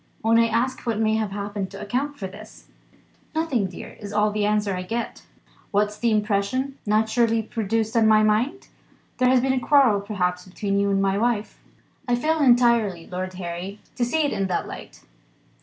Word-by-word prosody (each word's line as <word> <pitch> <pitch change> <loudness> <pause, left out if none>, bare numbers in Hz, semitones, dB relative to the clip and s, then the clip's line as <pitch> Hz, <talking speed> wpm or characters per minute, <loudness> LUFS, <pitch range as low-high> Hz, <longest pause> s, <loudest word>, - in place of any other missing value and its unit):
When 225 +1 +4
I 230 - +4
ask 235 +3 0
what 225 -2 0
may 220 -1 +2
have 215 -2 -1
happened 200 -1 -4
to 195 - -10
account 260 +8 -2
for 195 - -5
this 210 +3 -11 0.7
'Nothing, 285 -11 0
dear,' 180 - -10
is 205 -1 -7
all 210 0 +2
the 210 0 0
answer 210 -2 +1
I 180 - -3
get. 230 +6 -4 0.5
What's 210 +1 +1
the 235 - +2
impression 215 +5 0
naturally 225 +2 +2
produced 225 +1 -2
on 225 -1 +4
my 215 0 +5
mind? 225 - 0 0.5
There 255 0 +4
has 255 -1 +4
been 265 +1 +1
a 260 - +1
quarrel 255 -6 +4
perhaps 180 -3 -2
between 200 +2 -2
you 200 0 +1
and 195 0 +2
my 195 +1 +1
wife." 230 -2 -1 0.5
"I 245 - +3
fail 315 +6 0
entirely, 235 - +3
Lord 185 0 -5
Harry, 180 +3 -6 0.2
to 245 - 0
see 310 +7 +1
it 290 - 0
in 195 -2 -1
that 185 - -2
light." - - -10
215 Hz, 190 wpm, -24 LUFS, 200-240 Hz, 0.7 s, my